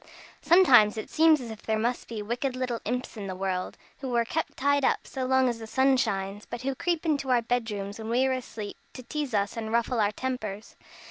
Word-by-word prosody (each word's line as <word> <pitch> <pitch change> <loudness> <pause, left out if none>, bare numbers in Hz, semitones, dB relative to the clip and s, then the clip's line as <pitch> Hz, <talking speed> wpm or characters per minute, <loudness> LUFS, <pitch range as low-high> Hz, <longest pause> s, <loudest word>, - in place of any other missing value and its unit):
Sometimes 255 - +6
it 215 - -6
seems 320 -1 +5
as 240 -3 -7
if 220 - -9
there 220 0 -1
must 240 +3 -1
be 220 -3 -5
wicked 245 +4 -2
little 250 -2 -2
imps 250 +1 -3
in 200 -2 -5
the 185 - -4
world, 185 -1 -3 0.2
who 260 -3 -3
are 235 0 +3
kept 320 +7 -3
tied 285 +1 +2
up - - +1
so 260 -2 -4
long 260 0 +4
as 235 -2 -1
the 225 - -8
sun 265 +3 +3
shines, 200 -4 -2
but 240 +1 -6
who 270 +1 0
creep 340 +4 -1
into 285 -4 0
our 245 -2 +3
bed 240 -1 0
rooms 200 0 -5
when 220 0 -6
we 250 +3 +3
are 265 - +2
asleep, 225 -5 -6 0.2
to 255 - -9
tease 285 -2 -3
us 200 -1 0
and 220 -1 -4
ruffle 235 +1 +1
our 205 0 +2
tempers. 215 -3 -5
240 Hz, 230 wpm, -27 LUFS, 215-260 Hz, 0.2 s, Sometimes